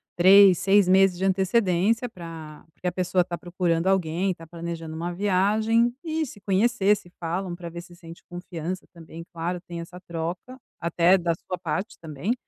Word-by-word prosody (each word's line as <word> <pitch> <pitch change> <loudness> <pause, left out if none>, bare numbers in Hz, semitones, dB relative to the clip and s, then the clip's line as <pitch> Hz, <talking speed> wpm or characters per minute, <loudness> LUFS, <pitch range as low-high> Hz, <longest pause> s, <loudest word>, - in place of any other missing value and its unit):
3, 190 +1 +7
6 195 0 +4
meses 190 -1 +5
de 190 - -4
antecedência 195 +4 +1
pra 165 -6 -10
porque - - -16
a - - +1
pessoa 180 0 +1
tá 175 -1 -5
procurando 175 -1 -1
alguém 185 0 +1
e - - -4
tá 165 - -12
planejando 165 -1 -6
uma 170 +2 -4
viagem, 215 +5 +2
e 320 -1 -1
se 210 -7 -12
conhecer 205 +1 +2
se 175 - -15
falam 175 +2 -3
pra 175 -1 -8
ver 170 +1 -7
se 175 0 -15
sente 170 -1 -13
confiança 175 0 -6
também, 165 0 -10
claro, 170 +2 -3
tem 170 -2 -8
essa 175 +2 -9
troca 170 +10 -5 0.2
até 170 +2 +4
da 170 -1 0
sua 180 - -6
parte 185 +3 -4
também. 160 - -3
180 Hz, 180 wpm, -25 LUFS, 170-195 Hz, 0.2 s, 3